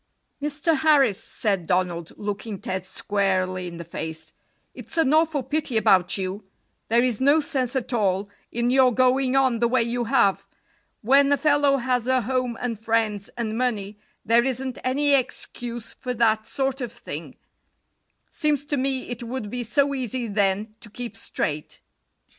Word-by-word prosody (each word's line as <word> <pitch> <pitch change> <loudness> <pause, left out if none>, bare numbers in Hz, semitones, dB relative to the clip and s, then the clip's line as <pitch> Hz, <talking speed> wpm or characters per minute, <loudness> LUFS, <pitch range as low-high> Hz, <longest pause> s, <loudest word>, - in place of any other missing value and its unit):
"Mr. 300 +2 0
Harris," 275 -8 +3
said 195 -6 -2
Donald, 180 -2 0
looking 205 0 -4
Ted 185 0 -4
squarely 185 -3 -1
in 170 -1 -8
the 170 - -6
face, 160 -1 -6 0.4
"it's - - -9
an 305 -3 +3
awful 315 -3 +2
pity 295 -5 -1
about 190 -4 +4
you; 190 +2 -4 0.4
there 235 +2 +3
is 250 -2 0
no 285 +4 +5
sense 280 -4 -1
at 260 -1 -2
all 200 -3 +1 0.2
in 240 +1 0
your 260 -1 +5
going 255 +1 +2
on 260 -4 +3
the 235 - +3
way 245 0 +2
you 240 +1 -2
have. 230 -6 +2 0.6
When 275 +4 +5
a 285 - +4
fellow 290 -2 +3
has 250 -1 0
a 260 0 +3
home 250 0 -1
and 235 -4 -3
friends 220 -3 0
and 220 -2 -2
money, 215 -4 -2 0.3
there 230 +2 +5
isn't 260 -1 -2
any 285 +3 +2
excuse 240 -3 -2
for 250 -1 -5
that 220 -1 +2
sort 270 +2 -2
of 240 -3 -4
thing. - - -7 1.0
Seems 300 -3 0
to 290 0 -1
me 265 0 -1
it 245 -1 -6
would 235 -3 -5
be 245 - -3
so 280 +5 +1
easy 255 -2 -2
then 205 +1 0
to 220 - -8
keep 240 +3 -7
straight." 150 0 -4
240 Hz, 165 wpm, -24 LUFS, 205-265 Hz, 1.0 s, no